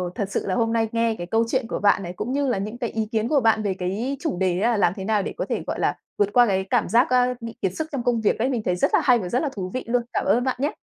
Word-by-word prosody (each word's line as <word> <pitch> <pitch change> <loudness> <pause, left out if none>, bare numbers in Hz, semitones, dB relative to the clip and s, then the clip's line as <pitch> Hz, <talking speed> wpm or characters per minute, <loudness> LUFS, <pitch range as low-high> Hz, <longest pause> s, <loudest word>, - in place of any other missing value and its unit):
thật 200 - -2
sự - - -2
là 185 - 0
hôm 225 0 +1
nay 225 -1 +1
nghe 230 -1 +1
cái 175 - -6
câu 225 +4 +2
chuyện 255 -2 0
của - - -3
bạn 200 -1 +3
này, 175 0 -6
cũng 225 +7 -4
như 285 -1 0
là 245 - +1
những 210 +4 -4
cái 240 -2 -3
ý 220 -1 -2
kiến 220 0 0
của 285 +2 +3
bạn 220 -2 +3
về 200 -2 0
cái 200 +10 -3
chủ 285 - -2
đề 185 -1 +1
á, 235 +4 +2
là 225 - +1
làm 175 -3 +3
thế 195 - -6
nào 210 -1 +2
để - - -4
có - - -2
thể, - - -2
gọi - - -3
là, - - +1 0.2
vượt 205 -1 +2
qua 245 -1 +6
cái 190 -1 +1
cảm 245 -3 +1
giác, 240 +7 +4
a, 250 0 +3
bị 230 0 -7
kiệt 190 -3 0
sức 315 - -3
trong 275 -5 -3
công 235 -2 +1
việc 215 - +1
ấy, 250 +4 +1
mình 240 -4 -1
thấy 180 - +1
rất 180 - 0
là - - +5
hay 250 -4 +4
và 180 -4 -5
rất 245 - +1
là 295 - -1
thú 185 -2 -4
vị 255 - -3
luôn. 245 +1 +1
Cảm - - -1
ơn 245 - +3
bạn 260 0 0
nhé! 290 +2 0
225 Hz, 350 wpm, -23 LUFS, 200-245 Hz, 0.2 s, qua